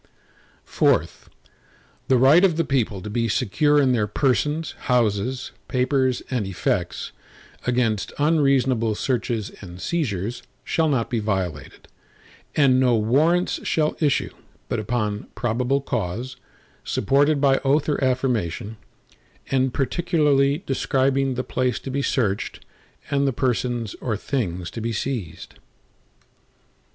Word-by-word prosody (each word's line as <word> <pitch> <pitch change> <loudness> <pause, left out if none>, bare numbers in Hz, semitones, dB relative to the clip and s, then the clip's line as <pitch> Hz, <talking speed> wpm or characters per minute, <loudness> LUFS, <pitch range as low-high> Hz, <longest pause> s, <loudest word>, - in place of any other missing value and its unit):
IV - - +1 0.8
The 130 - +4
right 140 +8 +6
of 175 -5 +3
the 165 - +2
people 110 -9 -1
to 105 - -5
be 115 +1 0
secure 145 +9 +2
in 135 -3 +3
their 110 -4 +1
persons, 145 +7 0 0.2
houses, 125 +1 0 0.2
papers, 130 0 +1
and 120 -6 -1
effects, 95 - -2 0.6
against 115 -5 0
unreasonable 135 -7 +2
searches 120 -3 -2
and 90 -2 -10
seizures, 120 - -2 0.2
shall 160 +3 +1
not 125 -6 0
be 120 - +1
violated, 95 -9 -3 0.7
and 135 -3 +4
no 125 -2 +4
Warrants 150 +11 +2
shall 155 -1 0
issue, 145 -4 +1 0.4
but - - -1
upon 105 -2 -2
probable 125 +4 0
cause, 120 +2 -3 0.5
supported 145 +5 +2
by 135 -1 +3
oath 140 +2 +2
or 145 -2 0
affirmation, 120 -5 -1 0.7
and 130 -1 +2
particularly 145 0 +1
describing 135 0 +1
the 130 - -2
place 130 -1 -1
to 135 - -6
be 140 +1 -1
searched, 110 -8 -1 0.5
and 140 0 +2
the 135 - +1
persons 120 -4 -1
or 110 -4 -1
things 90 -9 -3
to 115 - -6
be 115 +1 -2
seized. 105 - -5
130 Hz, 120 wpm, -23 LUFS, 110-140 Hz, 0.8 s, right